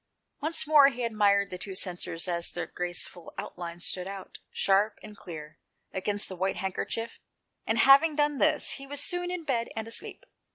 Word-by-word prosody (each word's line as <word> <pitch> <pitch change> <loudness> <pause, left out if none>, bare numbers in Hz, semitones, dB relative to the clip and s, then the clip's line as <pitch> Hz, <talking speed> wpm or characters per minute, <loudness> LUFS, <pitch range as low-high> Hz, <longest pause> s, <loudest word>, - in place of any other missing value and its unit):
Once 315 +2 0
more 295 -2 +8
he 250 -2 -5
admired 200 -3 +2
the 180 - -6
two 195 0 -6
censers 175 -2 -1
as 170 -1 0
their 175 - -4
graceful 175 -1 -4
outlines 175 -3 -5
stood 180 0 -1
out, 195 -1 -8
sharp 200 +2 +2
and 210 -1 -10
clear, 155 -6 -9 0.3
against 205 +2 0
the 190 - -6
white 190 +2 0
handkerchief, 225 +4 -3 0.5
and 220 - +1
having 275 +6 +7
done 295 -1 +1
this, - - +3
he 275 -1 -4
was 285 +1 -4
soon 355 0 -1
in 360 -2 -4
bed 240 -6 -1
and 220 0 -4
asleep. 235 - -2
205 Hz, 175 wpm, -28 LUFS, 180-275 Hz, 0.5 s, more